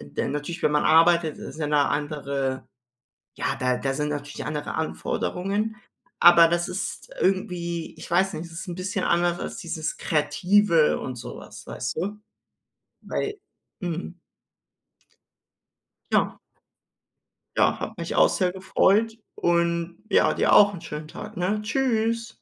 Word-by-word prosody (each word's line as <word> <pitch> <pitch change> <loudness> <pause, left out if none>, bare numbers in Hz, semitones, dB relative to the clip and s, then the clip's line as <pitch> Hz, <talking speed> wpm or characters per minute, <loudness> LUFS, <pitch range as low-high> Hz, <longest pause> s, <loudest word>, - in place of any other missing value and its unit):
de 70 - -4
natürlich, 150 +4 -4
wenn 150 - +3
man 150 - +3
arbeitet, 165 0 +4
ist 155 - -8
ja 150 - -1
'ne 150 -1 +3
andere 140 -3 -2 0.7
ja, - - -2
da 125 0 +1
da 135 +1 -1
sind 150 +2 -1
natürlich 145 -1 -5
andere 150 0 -3
Anforderungen, 195 +6 -2 0.5
aber 170 -1 +9
das 175 +1 0
ist 195 +2 -5
irgendwie 175 -3 -1
ich - - -10
weiß 190 +3 +3
nicht, 160 - -5
es 165 - -12
ist 170 +3 -6
'n 175 - -4
bisschen 190 +2 -3
anders 175 0 +2
als - - -5
dieses 170 -4 -4
Kreative 165 +3 +3
und 130 -2 -5
so - - -8
was, - - -12
weißt - - -4
du? 205 +5 -3 0.8
Weil 425 - -3 0.5
mhm. 175 0 -4 1.9
Ja. - - +2 1.2
Ja, - - +3
hat - - -6
mich - - -4
auch - - +6
sehr 185 -3 +1
gefreut 205 +4 +2 0.2
und 170 0 0
ja, - - +4
dir - - +3
auch 205 0 +7
'n 180 - -8
schönen 150 -1 -7
Tag, 210 +5 -9
ne? 190 +4 0
Tschüss. 230 -1 0
170 Hz, 145 wpm, -25 LUFS, 150-195 Hz, 1.9 s, aber